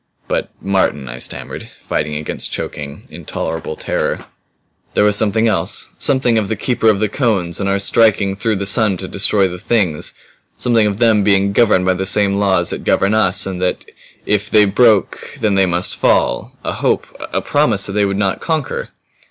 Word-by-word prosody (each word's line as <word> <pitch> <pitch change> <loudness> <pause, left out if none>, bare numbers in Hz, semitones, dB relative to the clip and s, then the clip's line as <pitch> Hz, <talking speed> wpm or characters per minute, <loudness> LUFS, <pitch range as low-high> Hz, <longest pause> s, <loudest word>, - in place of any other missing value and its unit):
"But - - -2
Martin," 95 -8 0
I - - -7
stammered, - - -8
fighting 75 - -3
against 75 +1 -3
choking, 70 -1 -6
intolerable 80 -1 -5
terror, - - -3 0.7
"there - - +4
was 105 -1 +4
something 110 +2 +2
else. 95 -2 -1
Something 130 -5 +2
of 105 - -2
the 110 - -2
Keeper 115 +1 +1
of 105 -3 +2
the 110 - +1
Cones 100 - -1
and 100 -1 -1
of - - +2
our - - +1
striking 100 -1 +2
through 110 +2 -1
the 100 0 -3
sun 105 -2 +2
to 95 - -6
destroy 100 0 +2
the 90 0 -7
Things 95 -8 0 0.4
something 115 -3 +2
of 100 -1 -2
them 110 -2 +3
being 100 -1 +2
governed 105 -5 +3
by 95 - +3
the 95 +1 -3
same 100 0 +1
laws 100 -2 +2
that - - -5
govern 100 +2 +2
us 110 -4 +3
and 95 -2 -5
that 90 - -1 0.4
if 105 0 0
they 105 -1 +5
broke 105 0 +2
them 105 -2 +1
they 95 -1 +3
must 90 +1 -1
fall. - - 0
A - - -2
hope - - 0 0.3
a - - 0
PROMISE, 115 -9 +1
that - - -5
they 105 +1 +1
would 100 0 -1
NOT 100 -1 -1
conquer." 160 -4 -2
100 Hz, 190 wpm, -17 LUFS, 95-110 Hz, 0.7 s, they